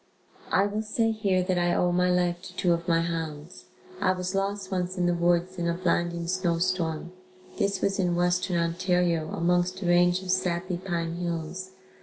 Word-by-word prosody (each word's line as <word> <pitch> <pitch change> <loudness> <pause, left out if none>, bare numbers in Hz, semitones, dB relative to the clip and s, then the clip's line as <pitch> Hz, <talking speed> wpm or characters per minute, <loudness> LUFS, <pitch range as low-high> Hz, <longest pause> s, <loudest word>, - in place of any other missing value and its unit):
I 195 - +4
will 205 +1 -2
say 225 +1 0
here 200 -4 +1
that 180 -1 0
I 175 0 +2
owe 180 - +2
my 180 +1 +2
life 175 -1 +1
to 185 -1 -11
two 175 -1 +2
of 170 0 -3
my 165 -1 +3
hounds. 165 0 -5 0.4
I 185 -1 +3
was 180 0 -3
lost 195 0 -2
once 185 0 -2
in 180 - +1
the 175 - +3
woods 175 +1 +1
in 170 - 0
a 170 - 0
blinding 170 -1 0
snow 175 -1 0
storm. 175 -2 -1 0.5
This 200 -2 0
was 195 0 0
in 175 -2 +1
Western 180 +1 +1
Ontario 170 -1 +1
amongst 180 +2 0
a - - -4
range 175 +1 +3
of 185 - -2
sappy 180 -1 0
pine 170 -2 -3
hills. 175 +2 -4
180 Hz, 190 wpm, -27 LUFS, 170-185 Hz, 0.5 s, I